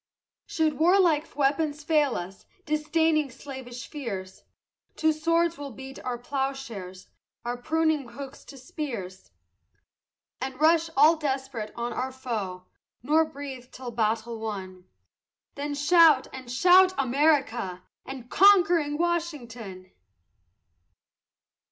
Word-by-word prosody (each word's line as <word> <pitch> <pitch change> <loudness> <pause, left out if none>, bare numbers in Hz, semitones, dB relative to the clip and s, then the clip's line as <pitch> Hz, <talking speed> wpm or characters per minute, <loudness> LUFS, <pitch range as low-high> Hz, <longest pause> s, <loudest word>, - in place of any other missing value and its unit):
Should 310 -3 0
warlike 330 -3 +3
weapons 290 +1 0
fail 295 -4 +2
us, 185 +2 -7 0.2
disdaining 305 0 +1
slavish 250 -2 -9
fears, 195 -10 -7 0.5
To 315 0 +2
swords 335 +1 +1
we'll 285 -1 -6
beat 265 +2 -10
our 250 -1 -3
ploughshares, 245 -8 -5 0.4
our 240 0 -2
pruning 315 0 0
hooks 275 +2 -9
to 275 - -12
spears, 235 -9 -6 1.1
And 260 0 -5
rush, 325 +1 +4
all 310 +4 +6
desperate, 265 -7 -3
on 240 0 -3
our 260 +1 -3
foe, 215 -9 -5 0.4
nor 310 +4 +3
breathe 270 -4 -9
till 250 -1 -7
battle 225 0 -1
won, 190 -4 -6 0.7
Then 285 +1 -4
shout, 300 -2 +5
and 260 -2 -8
shout 365 +7 +5
America! 260 - +1 0.2
and 265 -3 -8
conquering 345 -5 +4
Washington! 245 - -3
275 Hz, 110 wpm, -27 LUFS, 240-310 Hz, 1.1 s, all